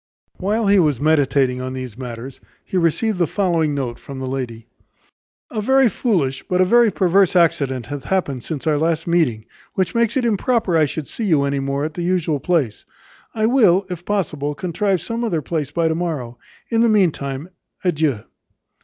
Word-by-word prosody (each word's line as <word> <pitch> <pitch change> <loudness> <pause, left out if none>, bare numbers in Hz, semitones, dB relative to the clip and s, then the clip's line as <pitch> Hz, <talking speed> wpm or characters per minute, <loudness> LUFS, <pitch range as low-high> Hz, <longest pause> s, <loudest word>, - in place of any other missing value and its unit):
While 210 +4 0
he 200 0 +5
was 150 -7 +2
meditating 140 -4 +2
on 130 0 -4
these 130 -4 -6
matters, 125 +1 -8 0.2
he - - -6
received 180 +4 +1
the 175 - +2
following 165 -7 0
note 125 -4 -3
from 140 - -9
the 130 - -4
lady: 125 -4 -4 0.9
"A 215 - -2
very 265 +2 +4
foolish, 165 - 0
but 180 - -2
a 185 - +5
very 235 +3 +5
perverse 190 0 +3
accident 140 -8 +2
hath 145 +3 -6
happened 145 -10 -1
since 155 -5 -5
our 150 -2 +2
last 165 0 0
meeting, 155 -11 +1 0.3
which 185 -2 0
makes 235 +1 +1
it 255 - +1
improper 225 -3 +1
I 160 -1 +4
should 150 +1 -5
see 230 - -4
you 155 -7 +3
any 140 0 0
more 140 +1 -1
at 155 - -4
the 175 - -5
usual 170 -4 0
place. 150 -9 0 0.5
I 215 -1 +1
will, 210 -6 +4
if 175 -1 -5
possible, 150 -8 -2
contrive 185 +4 -1
some 230 +1 -3
other 170 -10 -1
place 155 -3 -2
by 165 +2 0
to 160 - +1
morrow. 150 -9 -4 0.3
In 225 0 +3
the 235 - +4
meantime, 160 -7 0 0.3
adieu." 155 - +1
165 Hz, 185 wpm, -20 LUFS, 140-190 Hz, 0.9 s, he